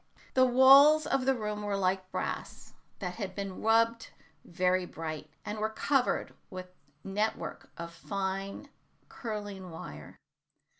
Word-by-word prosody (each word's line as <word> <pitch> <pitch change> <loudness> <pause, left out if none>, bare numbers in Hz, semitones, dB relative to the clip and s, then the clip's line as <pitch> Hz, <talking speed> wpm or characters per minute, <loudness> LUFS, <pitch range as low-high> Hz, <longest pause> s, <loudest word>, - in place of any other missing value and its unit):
The 260 0 +5
walls 275 +5 +8
of 270 -3 0
the 270 - +4
room 210 -2 -3
were 205 -1 -1
like 185 -1 0
brass - - -5 0.2
that 180 -3 -5
has 200 -4 -3
been 195 -2 -5
rubbed 230 +1 +3 0.3
very 185 +1 +1
bright, 155 -3 -6 0.2
and 210 +1 -4
were 215 +1 0
covered 260 +4 0 0.2
with 185 0 -8 0.3
net 210 +3 0
work - - -8
of 170 0 -7
fine 195 +7 -4 0.4
curling 205 -5 -6
wire. 75 - -9
200 Hz, 135 wpm, -30 LUFS, 185-230 Hz, 0.4 s, walls